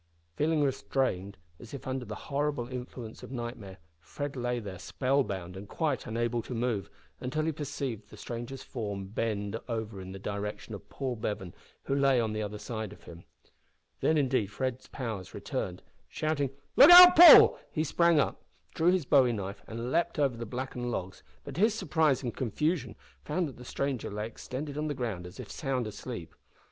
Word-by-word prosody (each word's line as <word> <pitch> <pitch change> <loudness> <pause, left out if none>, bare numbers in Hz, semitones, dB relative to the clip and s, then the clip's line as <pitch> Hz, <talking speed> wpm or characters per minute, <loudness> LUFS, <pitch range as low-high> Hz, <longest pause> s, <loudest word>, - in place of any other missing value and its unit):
Feeling 155 0 +2
restrained, 125 -8 -1 0.2
as 120 +3 -9
if 140 - -9
under 130 -1 -3
the 105 -1 -6
horrible 145 -3 -2
influence 125 -2 -7
of - - -9
nightmare, 120 -6 -6 0.2
Fred 140 - -6
lay 120 -1 -1
there 100 -5 -7
spell 135 +8 +1
bound 95 -5 -6
and 95 +1 -9
quite 150 -6 -1
unable 120 +1 -1
to 125 - -6
move, 115 -4 -1 0.3
until 140 +5 -2
he 160 - +1
perceived 140 -7 -5
the - - -13
stranger's 120 +3 -6
form 100 -5 -5
bend 105 0 -2
over 110 -4 -4
in 95 0 -8
the 95 - -7
direction 105 +2 -5
of 100 - -9
Paul 130 -3 -3
Bevan, 105 -4 -4 0.3
who - - -2
lay 140 -2 +3
on 110 -2 0
the 110 - -2
other 105 0 -4
side 110 -2 -5
of - - -17
him. 85 0 -12 0.7
Then, 160 - +2
indeed, 130 -7 +1
Fred's 125 +5 -4
powers 110 -8 -6
returned. 90 -1 -4 0.2
Shouting, 155 -3 -1 0.3
"look 285 - +9
out, 360 0 +12
Paul!" 345 +1 +10
he 155 - 0
sprang 170 +1 +3
up, - - 0 0.3
drew 165 +2 +3
his 180 -4 +2
bowie 130 -3 +4
knife, 100 -2 -5
and 115 +2 -5
leaped 170 - +1
over 140 -4 +2
the 115 -1 -6
blackened 125 +1 -4
logs, 95 -5 -4 0.2
but, 140 - -8
to 170 - -3
his 220 0 +4
surprise 160 - +1
and 120 -3 -3
confusion, 130 - -1 0.3
found 175 - -1
that 135 - -10
the 125 - -10
stranger 135 -1 -2
lay 105 +1 -4
extended 140 +5 -6
on 155 - -1
the 145 - -2
ground 110 -9 -4
as 90 - -13
if - - -8
sound 135 -5 -2
asleep. 105 -3 -7
125 Hz, 185 wpm, -30 LUFS, 105-140 Hz, 0.7 s, out